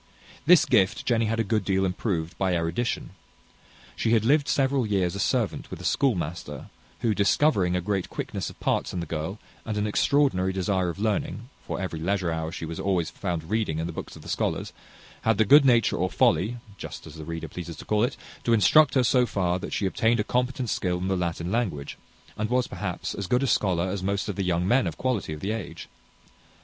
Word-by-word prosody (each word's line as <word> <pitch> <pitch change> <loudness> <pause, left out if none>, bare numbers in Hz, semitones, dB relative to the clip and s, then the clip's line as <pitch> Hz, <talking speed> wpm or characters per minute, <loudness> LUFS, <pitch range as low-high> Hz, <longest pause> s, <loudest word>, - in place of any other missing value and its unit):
This 175 0 +7
gift 110 -5 +2
Jenny 115 -2 +2
had 115 +1 -1
a - - +3
good 110 0 0
deal 95 0 +1
improved 90 -3 -2
by 95 -2 +1
erudition. 85 +5 -2 0.8
She 115 - +1
had 110 -1 +3
lived 145 +3 +3
several 135 -1 +2
years 95 -4 +1
a 100 - -5
servant 115 0 0
with - - -7
a - - -9
schoolmaster, 85 - -1 0.3
who, 115 -2 +2
discovering 100 - +2
a 90 - 0
great 100 0 -2
quickness - - -4
of - - -14
parts - - 0
in 90 - -2
the 85 - -3
girl, 80 +5 -4 0.3
and 110 -2 -3
an 105 - 0
extraordinary 105 -4 +2
desire 95 -1 0
of 85 - -5
learning 115 +4 -2 0.2
for - - -3
every 90 -4 -4
leisure 90 0 0
hour 80 0 -3
she 80 - -5
was 80 0 -6
always 90 -4 0
found 85 -2 -4
reading 110 -8 0
in 80 - -2
the 85 - -5
books - - -7
of - - -12
the - - -11
scholars - - -2 0.5
had 110 -2 +2
the 110 - +4
good 140 +6 +7
nature, 120 -4 +4
or 90 +1 0
folly 105 +10 +2 0.2
just - - -8
as 80 - -10
the 80 0 -8
reader 80 +1 -5
pleases 85 -2 -7
to - - -11
call 105 0 +1
it 125 +2 -1 0.3
to 115 - +2
instruct 150 +9 +5
her 130 - +4
so 125 0 +3
far, 90 -3 0
that - - -6
she 100 - -1
obtained 115 +4 +2
a - - +2
competent 125 0 -1
skill 90 -1 0
in 90 +2 -3
the 95 - +1
Latin 85 0 -2
language, 90 -12 -2 0.4
and 110 +1 -1
was, 125 0 +2
perhaps, - - -4
as 100 -2 -4
good 125 +5 +2
a - - +2
scholar 95 -8 +1
as 95 0 -3
most 100 +1 -1
of 100 - -3
the 100 - -2
young 90 0 0
men 125 +4 +3
of - - -5
quality 125 -10 -1
of 75 -1 -6
the 100 - -2
age. 110 -4 -6
100 Hz, 220 wpm, -26 LUFS, 90-115 Hz, 0.8 s, This